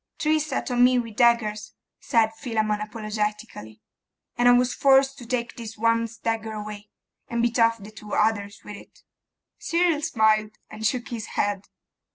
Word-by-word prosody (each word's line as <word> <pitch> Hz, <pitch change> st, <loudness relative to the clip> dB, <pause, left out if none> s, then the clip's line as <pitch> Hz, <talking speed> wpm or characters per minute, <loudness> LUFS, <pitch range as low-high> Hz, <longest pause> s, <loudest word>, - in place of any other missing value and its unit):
'Three 310 Hz, 0 st, +2 dB
set 295 Hz, -3 st, -3 dB
on 245 Hz, 0 st, +3 dB
me 250 Hz, 0 st, +5 dB
with 230 Hz, -3 st, -3 dB
daggers,' 220 Hz, -3 st, +1 dB, 0.2 s
said 225 Hz, -3 st, +1 dB
Philammon, 215 Hz, -3 st, -1 dB
apologetically, 210 Hz, -, -5 dB, 0.5 s
'and 245 Hz, 0 st, +4 dB
I -, -, +8 dB
was 245 Hz, 0 st, +3 dB
forced 270 Hz, 0 st, +3 dB
to 240 Hz, -, -11 dB
take 235 Hz, -1 st, -2 dB
this 225 Hz, -2 st, -8 dB
one's 230 Hz, +1 st, 0 dB
dagger 225 Hz, -1 st, -3 dB
away, 210 Hz, -1 st, -7 dB, 0.4 s
and 235 Hz, 0 st, -1 dB
beat 240 Hz, +1 st, 0 dB
off 230 Hz, 0 st, +4 dB
the 210 Hz, 0 st, -12 dB
two 210 Hz, -1 st, -10 dB
others 205 Hz, -2 st, 0 dB
with 205 Hz, -, -8 dB
it.' -, -, -17 dB, 0.6 s
Cyril 335 Hz, -3 st, +1 dB
smiled, 215 Hz, -6 st, +1 dB
and 215 Hz, 0 st, -1 dB
shook 245 Hz, 0 st, -3 dB
his 225 Hz, -2 st, -5 dB
head. 205 Hz, -1 st, 0 dB
225 Hz, 165 wpm, -24 LUFS, 215-245 Hz, 0.6 s, I